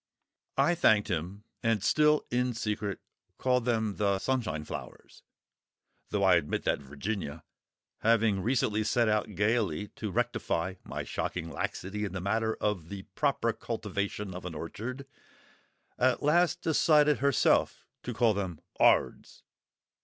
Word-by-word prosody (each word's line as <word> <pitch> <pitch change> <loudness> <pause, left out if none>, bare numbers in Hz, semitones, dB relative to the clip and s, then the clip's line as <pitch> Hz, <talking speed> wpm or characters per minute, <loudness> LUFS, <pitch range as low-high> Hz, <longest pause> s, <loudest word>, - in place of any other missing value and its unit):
I 175 - +4
thanked 110 - +3
him, 90 +5 -3 0.2
and 115 -4 +1
still, 150 +4 +3
in 125 0 0
secret, 105 -3 -2 0.4
call 125 -1 +2
them 110 -4 0
the 100 -2 +2
Sunshine 105 -10 -1
flowers—though 100 +5 -9
I 95 -2 +6
admit 75 -3 -2
that - - +1
Virginia, 75 +3 -5 0.6
having 115 -3 +3
recently 110 -2 +1
set 115 +2 +2
out 105 -1 0
gaily 105 -3 0
to 110 - -6
rectify 90 0 -1
my - - -5
shocking 85 -2 -4
laxity 100 +7 -4
in 100 -3 -3
the 95 - -3
matter 110 +4 0
of 95 -6 -2
the 100 -1 -6
proper 135 -6 +1
cultivation 105 -3 -4
of 90 - -7
an 90 -2 -6
orchard, 125 - -6 0.9
at 130 +2 +2
last 170 +4 +3
decided 150 -2 +4
herself 140 -2 +2 0.2
to 125 - -5
call 115 -1 +3
them 95 -5 -4 0.2
"'Ards." - - +2
105 Hz, 130 wpm, -29 LUFS, 95-120 Hz, 0.9 s, I